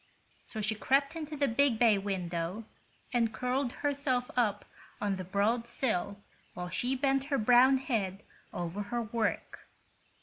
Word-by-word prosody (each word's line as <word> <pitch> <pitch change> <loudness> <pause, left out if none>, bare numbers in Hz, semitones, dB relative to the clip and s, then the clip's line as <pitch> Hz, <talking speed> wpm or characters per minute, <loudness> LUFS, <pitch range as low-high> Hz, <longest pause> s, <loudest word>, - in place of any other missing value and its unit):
So 220 - -6
she 210 +1 +1
crept 275 +7 +1
into 305 -2 -5
the 280 0 +2
big 255 0 +2
bay 220 -3 +4
window 180 0 -3 0.5
and 230 -2 +2
curled 250 +2 -1
herself 275 -3 0
up 210 -5 +1 0.3
on 200 -2 -1
the 185 - -4
broad 210 +6 0
sill 205 -5 -1 0.4
while 180 0 -5
she 250 +8 -1
bent 270 0 +1
her 280 -1 0
brown 250 +4 +6
head 205 -7 -2 0.3
over 175 +3 -4
her 235 +3 -2
work. 225 +1 -3
230 Hz, 145 wpm, -31 LUFS, 200-265 Hz, 0.5 s, brown